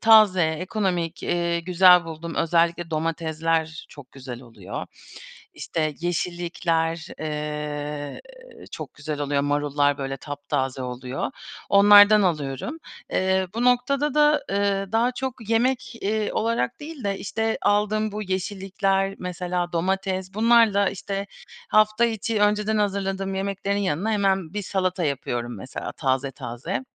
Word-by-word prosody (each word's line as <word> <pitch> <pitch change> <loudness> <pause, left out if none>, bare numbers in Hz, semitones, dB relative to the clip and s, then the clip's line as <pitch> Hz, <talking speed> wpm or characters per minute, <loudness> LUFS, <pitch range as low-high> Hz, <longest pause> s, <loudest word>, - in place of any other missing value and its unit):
taze, 215 -5 +6
ekonomik, 175 +1 -2
iii, 170 -1 -1
güzel 180 0 +6
bulduğum, 165 0 -7
özellikle 170 0 +1
domatesler 160 0 -1
çok 145 -3 -14
güzel 130 -2 -8
oluyor. 115 -2 -8 0.7
İşte, 155 -2 -2
yeşillikler, 170 -1 -1
eee, 150 -1 -4 0.5
çok - - -7
güzel 150 -1 -5
oluyor, 145 -1 0
marullar, 145 0 +1
böyle, 135 0 -4
taptaze 140 -2 -3
oluyor, 125 +1 -4 0.4
onlardan 205 +1 +8
alıyorum. 150 - -1 0.3
Eee, 190 0 +1
bu 235 - 0
noktada 260 +4 +2
da, 295 -1 +4
ııı, 195 0 0
daha 235 +3 +2
çok 255 -4 -5
yemek, 245 +2 +1
iii, 215 +1 -1
olarak 220 - -1
değil 295 -4 -8
de, 195 -1 -1
işte, 225 +2 -2
aldığım 210 +1 +1
bu 210 +1 -4
yeşillikler, 195 0 -1
mesela 180 -1 -3
domates, 190 +1 -1
bunlarla, 220 -2 +4
işte, 200 +1 -4 0.4
hafta 215 +2 +4
içi 225 -1 -1
önceden 210 +1 +2
hazırladığım 195 -1 -1
yemeklerin 200 +1 -2
yanına 200 +2 0
hemen 195 -4 +1
bir 210 - -2
salata 185 -2 -1
yapıyorum 120 -4 -3
mesela 130 +7 -6
taze 135 -1 -1
taze. 130 - -5
185 Hz, 120 wpm, -24 LUFS, 155-205 Hz, 0.7 s, onlardan